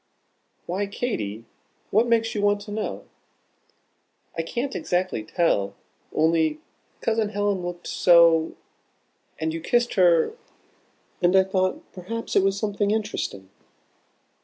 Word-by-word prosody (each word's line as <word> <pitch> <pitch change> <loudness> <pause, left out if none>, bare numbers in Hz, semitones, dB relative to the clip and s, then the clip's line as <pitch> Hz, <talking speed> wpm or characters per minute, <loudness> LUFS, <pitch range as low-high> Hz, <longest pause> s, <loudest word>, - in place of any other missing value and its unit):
"Why, 195 +4 -2
Katy? 115 - -3 0.5
What 225 +4 +3
makes 225 -1 +2
you 210 - -2
want 205 0 +3
to 205 - -9
know?" 215 0 -4 1.3
"I 165 - 0
can't 245 +11 -3
exactly 180 -10 -1
tell 105 - 0 0.4
only 160 -1 +2 0.4
Cousin 220 -2 +1
Helen 205 -2 0
looked 175 0 -6
so; 170 -2 +5 0.8
and 160 0 -2
you 165 - -4
kissed 240 +5 +1
her; 175 - +4 0.9
and 180 +1 +3
I 190 - +7
thought 185 -1 -1
perhaps 230 +6 -5
it - - +6
was 195 +1 +1
something 205 -1 -1
interesting." 205 - -3
190 Hz, 120 wpm, -24 LUFS, 165-210 Hz, 1.3 s, I